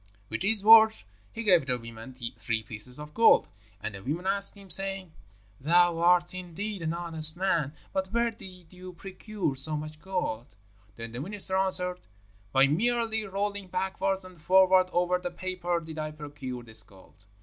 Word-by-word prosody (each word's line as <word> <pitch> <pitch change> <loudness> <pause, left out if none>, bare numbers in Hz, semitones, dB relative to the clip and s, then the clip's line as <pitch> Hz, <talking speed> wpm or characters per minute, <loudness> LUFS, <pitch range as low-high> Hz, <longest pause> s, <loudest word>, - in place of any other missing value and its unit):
With 110 - -5
these 200 +1 +2
words 220 0 +7 0.3
he 230 - -6
gave 180 -9 +3
the 125 -1 0
women 115 +2 -10 0.2
three 115 -1 -2
pieces 110 +3 +2
of 150 0 -10
gold; 230 0 +4 0.3
and 110 - -6
the 95 - -10
women 155 - -4
asked 200 +1 +1
him, 200 -2 -13
saying, 195 -2 -2 0.5
'Thou 170 +3 +3
art, 175 +1 +3
indeed, 185 +3 -6
an 165 0 -3
honest 160 -2 +6
man, 165 -6 -1 0.2
but 190 0 -3
where 235 +1 0
did 185 -5 -13
you 185 0 -11
procure 195 -2 -5
so 150 +3 +2
much 155 +1 -9
gold?' 140 - -4 0.4
Then 115 +1 -8
the 120 +3 -6
minister 190 +2 0
answered, 185 -1 +1 0.5
'By 135 +3 +4
merely 220 +7 0
rolling 200 0 -4
backwards 190 +1 -3
and 180 -3 -15
forwards 185 +1 +4
over 180 +1 0
this 175 -1 -6
paper 180 -2 -3
did 160 -1 -9
I 155 0 -3
procure 145 -5 -8
this 110 -1 +2
gold.' 95 -1 -19
180 Hz, 170 wpm, -27 LUFS, 150-195 Hz, 0.5 s, words